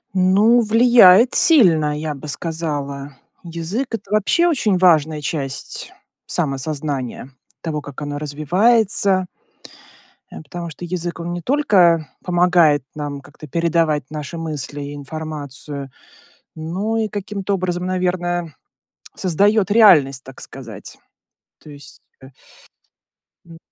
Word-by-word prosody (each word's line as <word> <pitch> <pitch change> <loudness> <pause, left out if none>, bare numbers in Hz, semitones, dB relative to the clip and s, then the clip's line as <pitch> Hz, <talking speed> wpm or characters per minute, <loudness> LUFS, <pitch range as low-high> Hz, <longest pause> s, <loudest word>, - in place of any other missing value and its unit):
Ну, 205 +6 +4
влияет 230 -1 +6
сильно, 160 - +4
я 155 -1 -3
бы 145 +2 -10
сказала. 145 -3 -4 0.3
Язык 175 +10 -4
это 205 - -10
вообще 215 - +2
очень 220 - +1
важная 155 -4 +3
часть 140 -3 -4 0.4
самосознания, 140 -4 -3 0.3
того, 155 -2 -3
как 145 -2 -10
оно 145 0 -4
развивается. 185 - +1 1.1
Э, - - -9
потому 170 +3 -7
что 170 +3 -9
язык, 175 0 -4
он 170 +1 -4
не 175 - -5
только 180 - +3 0.2
помогает 175 -5 +3
нам 145 -2 -5
как-то 145 +2 -14
передавать 165 -1 0
наши 150 +1 -6
мысли 150 -3 -5
и 145 +1 -7
информацию, 145 -1 -7 0.7
но 185 +8 -3
и 220 -1 0
каким-то 200 -1 -4
образом, 180 -1 -3
наверное, 175 -3 -2 0.6
создаёт 200 +3 +1
реальность, 150 - +5
так 135 0 -12
сказать. 115 -7 -10 0.6
То 155 - -13
есть, 145 -1 -13 0.2
э 130 - -13 1.2
М. 165 - -12
165 Hz, 115 wpm, -19 LUFS, 145-185 Hz, 1.2 s, влияет